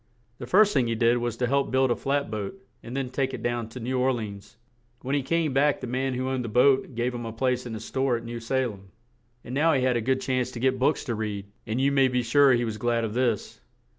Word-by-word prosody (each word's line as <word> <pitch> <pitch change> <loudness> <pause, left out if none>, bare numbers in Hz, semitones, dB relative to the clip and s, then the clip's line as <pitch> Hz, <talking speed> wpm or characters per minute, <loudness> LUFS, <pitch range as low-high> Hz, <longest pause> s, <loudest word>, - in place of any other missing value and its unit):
The - - -7
first 210 +2 +5
thing 130 -4 +2
he 115 - -1
did 120 +1 +3
was 120 -1 -3
to 125 - 0
help 140 +2 +1
build 130 -1 +2
a - - +2
flat 140 -3 -1
boat 105 - -5 0.2
and 120 +3 -6
then 130 -2 -3
take 135 0 -1
it - - -9
down 120 -2 -2
to 125 - -9
New 125 +2 -2
Or 130 +1 +3
le 120 -3 -2
ans; 105 +2 -10 0.5
when 130 +2 -2
he 145 - +2
came 155 +1 0
back 145 +2 +3
the - - -5
man 130 +1 -1
who 130 +1 -2
owned 130 -1 -1
the 115 - -4
boat 130 +2 +3
gave 120 +2 -1
him 120 -1 -5
a 115 - -5
place 125 +2 -1
in 115 - -5
his 110 0 -7
store 130 -2 0
at 115 - -9
New 120 0 -5
Sa 115 +3 -3
lem; 100 -5 -7 0.6
and 125 - -8
now 160 +4 +3
he 130 -2 +1
had 125 -2 +2
a - - -1
good 130 +3 +1
chance 130 -1 -1
to 120 - -6
get 130 +1 +1
books 140 +4 +2
to 120 - -3
read; 105 -2 -4 0.2
and 110 +3 -1
you 140 +1 +3
may 135 -1 +4
be 125 -1 0
sure 140 +2 +5
he 120 0 +1
was 110 -2 -4
glad 120 +1 0
of 110 -2 -3
this. 120 - -1
125 Hz, 280 wpm, -26 LUFS, 115-135 Hz, 0.6 s, first